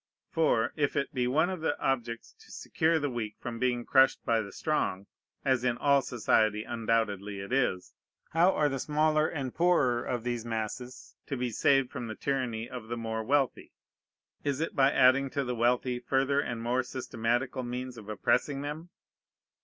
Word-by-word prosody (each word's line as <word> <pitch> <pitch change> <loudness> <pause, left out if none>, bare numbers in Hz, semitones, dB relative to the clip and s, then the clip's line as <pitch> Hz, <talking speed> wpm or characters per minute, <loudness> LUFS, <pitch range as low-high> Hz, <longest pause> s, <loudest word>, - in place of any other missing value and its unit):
For, 150 -8 +2
if 145 -2 0
it 140 - -1
be 125 -2 0
one 160 +8 +2
of 185 -3 -5
the 160 - -1
objects 120 -3 -2
to - - -18
secure 160 +1 0
the 145 -3 -1
weak 110 -3 -4
from 120 -2 -6
being 125 -1 0
crushed 130 0 +4
by 115 -1 +2
the 100 -2 -8
strong, 100 - -1 0.4
(as 130 -2 +2
in 120 -1 +1
all 140 0 +4
society 110 -3 +1
undoubtedly 110 -4 -1
it 100 +5 -6
is,) 125 -9 0 0.4
how 170 +3 +4
are 150 - +2
the 135 -2 -2
smaller 155 +2 +2
and 135 -5 -4
poorer 145 -9 +2
of 120 -3 -3
these 120 -2 -2
masses 115 +2 -5
to 135 - -3
be 125 -1 -2
saved 135 +3 +3
from 120 - -5
the 110 - -5
tyranny 120 -4 -2
of 125 -3 -8
the 120 +1 -4
more 110 -1 -3
wealthy? 135 +2 0 0.7
Is 140 -1 -1
it 165 - -2
by 135 0 +4
adding 130 +1 +4
to 140 +1 -1
the 125 -1 -2
wealthy 120 +1 +1
further 135 +3 +1
and 120 -5 -3
more 125 +2 +1
systematical 125 0 -2
means 125 +1 -5
of 110 -2 -11
oppressing 135 +6 0
them? 155 +4 -6
125 Hz, 180 wpm, -29 LUFS, 115-140 Hz, 0.7 s, crushed